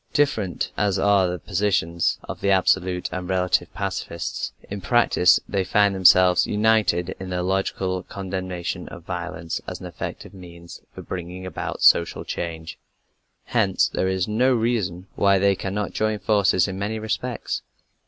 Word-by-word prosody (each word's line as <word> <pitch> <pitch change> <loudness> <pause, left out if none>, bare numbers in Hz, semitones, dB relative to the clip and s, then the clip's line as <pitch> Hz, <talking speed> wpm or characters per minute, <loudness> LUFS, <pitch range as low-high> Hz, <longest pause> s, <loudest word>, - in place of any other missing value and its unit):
Different 115 - 0
as 100 -2 +1
are 100 -1 +3
the 90 0 -3
positions 90 -3 0
of - - -8
the 100 - +1
absolute 95 -1 +2
and 90 -1 -4
the - - -3
relative 90 -1 +1
pacifists, 85 0 -4 0.2
in 100 0 -6
practice 95 -4 +4
they 95 -2 0
find 100 +2 +3
themselves 90 -1 +5
united 105 -5 +2
in 95 -1 -6
their 90 -1 -2
logical 95 0 -1
condemnation 95 -2 -5
of 85 - -10
violence 90 -2 -5
as - - -5
an - - -9
effective - - -7
means 85 -2 -12
for - - -8
bringing 90 +1 -6
about 95 - -5
social 85 - +4
change. 80 -1 -5 0.6
Hence - - +1
there 95 - -1
is 95 -1 0
no 125 +5 +2
reason 110 -7 -1
why 100 -1 +3
they 100 +1 +3
cannot 100 +2 -3
join 110 0 0
forces 100 -3 +2
in 95 0 -5
many 105 +3 -2
respects. 110 +3 -3
95 Hz, 155 wpm, -23 LUFS, 90-100 Hz, 0.6 s, themselves